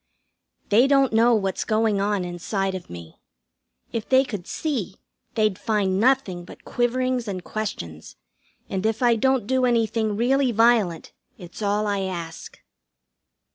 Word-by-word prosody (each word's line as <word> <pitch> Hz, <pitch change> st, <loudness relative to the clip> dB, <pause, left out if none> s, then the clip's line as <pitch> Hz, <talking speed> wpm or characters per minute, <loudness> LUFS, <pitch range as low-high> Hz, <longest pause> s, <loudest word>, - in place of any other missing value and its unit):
They 230 Hz, +6 st, +5 dB
don't 275 Hz, -3 st, +3 dB
know 230 Hz, +2 st, +5 dB
what's 195 Hz, -3 st, -1 dB
going 215 Hz, -2 st, +1 dB
on 200 Hz, -2 st, 0 dB
inside 190 Hz, +2 st, -2 dB
of 185 Hz, -2 st, -7 dB
me. 85 Hz, -2 st, -11 dB, 0.7 s
If 225 Hz, -2 st, -4 dB
they 260 Hz, 0 st, +5 dB
could 205 Hz, -9 st, -6 dB
see 260 Hz, -, -3 dB, 0.4 s
they'd 215 Hz, -4 st, +1 dB
find 200 Hz, -4 st, 0 dB
nothing 230 Hz, -7 st, +2 dB
but -, -, -14 dB
quiverings 250 Hz, 0 st, 0 dB
and 185 Hz, -3 st, -4 dB
questions, 85 Hz, -, -6 dB, 0.5 s
and 190 Hz, 0 st, -3 dB
if 220 Hz, +2 st, 0 dB
I 240 Hz, -1 st, +5 dB
don't 260 Hz, 0 st, +1 dB
do 260 Hz, +3 st, +1 dB
anything 225 Hz, -3 st, +1 dB
really 260 Hz, +2 st, +2 dB
violent 225 Hz, -7 st, +2 dB, 0.3 s
it's 175 Hz, +3 st, -11 dB
all 205 Hz, +1 st, 0 dB
I 205 Hz, -1 st, 0 dB
ask. 170 Hz, -4 st, -6 dB
215 Hz, 140 wpm, -24 LUFS, 190-240 Hz, 0.7 s, They